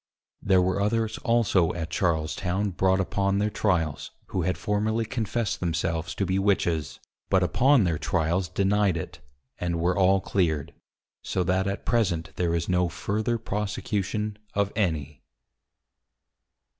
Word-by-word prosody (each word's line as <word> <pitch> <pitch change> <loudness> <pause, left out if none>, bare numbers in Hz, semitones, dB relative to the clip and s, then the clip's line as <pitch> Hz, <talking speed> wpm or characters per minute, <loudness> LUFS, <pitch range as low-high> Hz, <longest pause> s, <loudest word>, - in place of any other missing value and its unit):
There 95 -2 +4
were 95 +2 0
others 110 +1 0
also 115 -8 +2
at 85 -1 -4
Charles 80 -4 0
town 95 +2 -1
brought 95 +1 +2
upon 100 +1 0
their 105 +1 +1
Tryals, 85 -10 0 0.2
who 95 - -1
had 90 +2 0
formerly 110 +2 0
confess'd 115 -1 -2
themselves 85 -1 -2
to 100 - 0
be 95 +1 0
Witches; 80 -7 0 0.3
but 95 -1 +3
upon 125 - +4
their 85 -4 0
tryals 85 +4 0
deny'd 100 -1 +2
it, 80 - -6 0.4
and 85 -1 -1
were 90 +2 +1
all 95 0 +4
clear'd; 80 -7 -1 0.5
So 90 - -1
that 95 +2 +1
at 100 - -3
present 85 -9 0
there 85 -2 0
is 85 0 -1
no 90 -1 +2
further 110 +7 -1
prosecution 105 0 -3 0.2
of 100 0 0
any. 75 - -1
95 Hz, 145 wpm, -26 LUFS, 85-105 Hz, 0.5 s, There